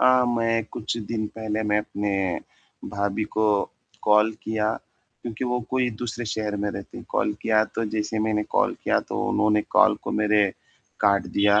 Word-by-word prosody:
अ, 130 0 +6
मैं 115 -2 +1
कुछ 115 +1 -3
दिन 110 -2 -2
पहले 110 0 -2
मैं 105 - +4
अपने 105 -1 -2 0.8
भाभी 100 +1 -1
को 110 - +3 0.6
कॉल 105 +1 +4
किया 110 0 0 0.5
क्योंकि 120 +1 -4
वो 125 0 0
कोई 130 -1 +2
दूसरे 120 +2 -4
शहर 105 -1 -2
में 105 0 -1
रहती 100 -1 -8
हैं, - - -10
कॉल 105 - +1
किया 110 -1 +4
तो 115 - 0
जैसे 110 +1 -1
मैंने 110 -1 +1
कॉल - - +2
किया - - +3
तो - - -2
उन्होंने 105 0 +3
कॉल - - +6
को - - -4
मेरे 105 0 +4 0.6
काट 100 -1 +3
दिया, 100 +1 +4
110 Hz, 170 wpm, -25 LUFS, 105-115 Hz, 0.8 s, अ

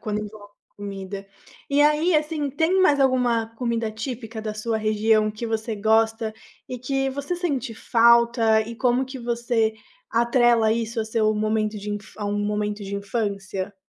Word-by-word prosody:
quando 210 -1 -3
é 210 - -8 0.5
comida. 195 -1 -7 0.4
E 280 +1 +3
aí, 300 +4 +3
assim, 300 -1 -1
tem 325 +7 +2
mais 295 -6 +4
alguma 250 -4 +2
comida 230 -2 -1
típica 225 0 -6
da 215 -1 -3
sua 220 +1 -2
região 215 0 +2
que 215 +2 -6
você 225 0 -2
gosta 220 +1 +2 0.4
e 250 - -5
que 270 +2 -1
você 280 +5 -3
sente 275 -9 -2
falta? 235 -1 +4
E 230 +2 -5
como 250 +1 +2
que 260 +1 -8
você 235 -2 0 0.4
atrela 235 -1 +3
isso 230 0 -2
ao - - -1
seu 220 -1 +1
momento 215 0 0
de 205 +1 -6
infanc 205 0 -6
A 210 - -4
um 205 0 -1
momento 210 0 -2
de 195 +1 -5
infância? 200 -2 -3
225 Hz, 165 wpm, -24 LUFS, 215-250 Hz, 0.5 s, mais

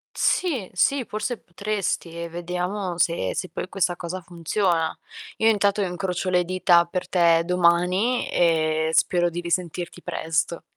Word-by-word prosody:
Sì, 270 - +1
sì, 260 +5 +2
forse 215 +3 -3
potresti 195 -1 -3
e 170 - -4
vediamo 180 +2 -3
se 165 - +1
se 185 - -3
poi - - -5
questa 180 -2 0
cosa 180 +2 -5
funziona. 170 0 -1 0.4
Io 220 - +4
intanto 205 -1 +2
incrocio 180 0 -2
le 180 -1 +2
dita 175 -1 +4
per 180 +1 -4
te 170 -2 +4
domani, 180 +7 +2
ehm, 160 -2 +2
spero 175 +1 +2
di 175 +1 -4
risentirti 175 0 -3
presto. 165 +1 -2
180 Hz, 140 wpm, -24 LUFS, 170-195 Hz, 0.4 s, Io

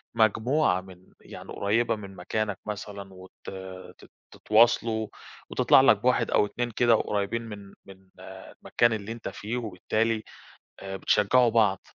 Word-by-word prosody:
مجموعة 110 0 +2
من 95 -1 -15 0.2
يعني - - -11
قُريبة 115 +3 +1
من 100 -2 -10
مكانك 105 +2 -3
مثلًا 100 -2 -7
وت 95 0 -14 0.7
ت - - -17 0.2
تتواصلوا، 110 0 +2 0.4
وتطلع - - +5
لك - - +5
بواحد - - +1
أو - - +4
2 120 +3 -4
كده 120 +1 +3
قريّبين 105 +1 -1
من 105 -3 -10
من 95 -1 -14 0.2
المكان 120 -1 -2
اللي 110 0 -5
أنت 115 0 -6
فيه، 110 +4 -5
وبالتالي 110 +1 -1 0.6
آآ 95 0 -6
بتشجّعوا 115 +5 +3
بعض. 105 -4 +2
110 Hz, 135 wpm, -26 LUFS, 100-115 Hz, 0.7 s, وتطلع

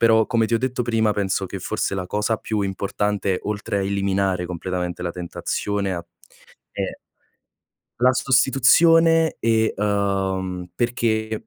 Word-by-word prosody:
...però, 110 -1 +5
come 115 -1 +1
ti 115 - -1
ho - - +3
detto 130 0 -2
prima, 110 -2 +1
penso 100 -2 -1
che - - -6
forse - - -2
la 90 -1 -3
cosa 105 +2 -1
più 110 -2 -2
importante, 100 0 -1
oltre 105 -1 -3
a 100 - 0
eliminare 95 -2 0
completamente 90 0 -4
la 85 - -2
tentazione 95 +3 -3
a 85 -1 -4 0.7
è - - -4 1.0
la 125 +1 +5
sostituzione 160 +6 +4
e, 110 -1 +2
uhm 95 -3 -1
perché, 110 -2 -1
105 Hz, 135 wpm, -22 LUFS, 95-115 Hz, 1.0 s, però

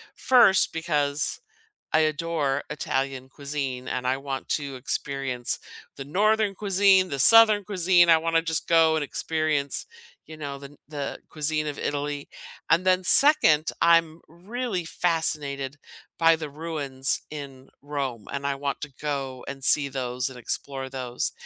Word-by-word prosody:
First, 235 -7 +4
because 150 -2 -1 0.5
I 155 - +5
adore 155 -2 -1
Italian 135 -2 -3
cuisine, 140 -3 -5
and 125 0 -3
I 130 +1 +1
want 135 -1 -6
to 140 -3 -2
experience 130 -1 -3 0.4
the 135 - -7
northern 210 +5 +1
cuisine, 195 -2 +3
the 140 - -3
southern 215 - +7
cuisine, 180 -3 +3
I 165 - +7
wanna 165 0 +1
just 160 -2 -2
go 165 -1 +4
and 155 - -1
experience, 155 -2 -2 0.4
you 155 - -11
know, 140 -2 -6
the 140 - -11
n - - -18
the 145 -2 -5
cuisine 155 0 -1
of 145 - -5
Italy. 145 0 -3 0.4
And 170 +2 +3
then 185 0 +3
second, 160 - +5
I'm 165 -1 +3
really 195 +3 -5
fascinated 150 -5 -2 0.4
by 165 -1 +5
the 155 -2 -6
ruins 145 -4 -2
in 135 -3 -9
Rome, 135 -6 -4
and 140 0 -4
I 140 -1 0
want 140 0 -4
to 150 -2 -7
go 135 -4 -4
and 135 -1 -7
see 145 0 +4
those 125 -1 -3
and 130 - -11
explore 135 +2 -4
those. 125 -2 -3
150 Hz, 150 wpm, -25 LUFS, 135-165 Hz, 0.5 s, southern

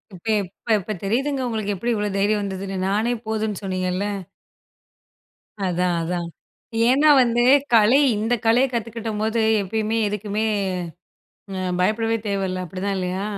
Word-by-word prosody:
இப்ப, 175 - -16 0.2
எப்ப 185 +3 -12
இப்ப 210 +3 -5
தெரியுதுங்க! 265 +7 0
உங்களுக்கு 215 -3 -2
எப்டி 235 +6 -2
இவ்ளோ 210 -1 -1
தைரியம் 205 +1 +2
வந்ததுன்னு, 195 -1 -4
நானே 215 +5 +1
போதுன்னு 220 -2 -2
சொன்னீங்கல்ல, 185 0 -1 1.6
அதான், 180 0 0
அதான். 175 +1 -2 0.6
ஏன்னா 280 +5 +5
வந்து 240 -1 +2 0.3
கலை, 230 +4 +6 0.2
இந்த 220 +3 0
கலையை 240 +4 +4
கத்துக்கிட்டம்போது 225 -1 -2 0.2
எப்பயுமே, 215 +3 -1
எதுக்குமே 210 +1 -2 1.1
அ 190 - -3 0.2
பயப்படவே 225 +4 +1
தேவையில்ல. 190 -2 -2
அப்படிதான் 190 +4 -3
இல்லையா? 185 +1 -2
210 Hz, 120 wpm, -22 LUFS, 190-225 Hz, 1.6 s, கலை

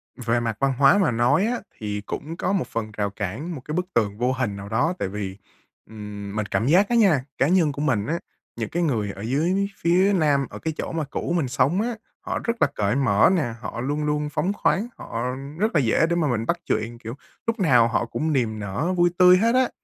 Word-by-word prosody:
Về 120 -1 0
mặt 115 -2 -2
văn 135 -1 +2
hóa 140 +8 +6
mà 195 -10 +3
nói 125 - +3
á 245 +2 -1 0.2
thì 105 -1 -4
cũng 160 +9 -5
có 185 - -1
một 195 - 0
phần 110 -1 -4
rào 100 -1 0
cản, 110 - -5
một 135 - -8
cái 150 - -5
bức 180 +1 0
tường 105 -3 +1
vô 125 +3 +1
hình 125 -6 -2
nào 100 0 -8
đó 125 - +1
tại - - -1
vì, 95 -1 -5 0.5
ừm, 105 -2 -8
mình 110 -1 -1
cảm 110 +3 -1
giác 185 +7 +4
á 240 - +2
nha, 190 - +4
cá 135 - +3
nhân 170 -3 +3
của 145 - -5
mình 125 -9 +1
á, 165 +7 -1 0.4
những 110 -2 -4
cái 175 +1 -1
người 110 -10 0
ở 100 - -10
dưới 165 - 0
phía 185 +4 +3
Nam 145 -6 +2
ở - - -9
cái 160 - -3
chỗ - - -4
mà 165 -1 -2
cũ 170 - -3
mình 160 -6 +1
sống 140 +9 +1
á, 235 +1 -2 0.2
họ - - -3
rất 230 - 0
là - - +6
cởi 105 +2 0
mở 115 -7 +4
nè, 140 -10 -1
họ 120 - -5
luôn 145 +4 -2
luôn 150 0 -1
phóng 180 +6 -1
khoáng, 205 +1 +1
họ 115 +1 -5 0.4
rất 215 -1 0
là - - +5
dễ 125 +4 +3
để 170 - +1
mà 165 -3 +1
mình 115 -4 -1
bắt - - 0
chuyện, 115 +2 -2
kiểu, 115 +1 -7 0.3
lúc 230 0 -1
nào 125 -11 +5
họ 115 0 0
cũng 155 +6 -2
niềm 115 -5 0
nở 105 - -2
vui 175 0 +4
tươi 180 0 +7
hết 230 +5 +2
á. 255 -1 +3
135 Hz, 245 wpm, -24 LUFS, 110-175 Hz, 0.5 s, tươi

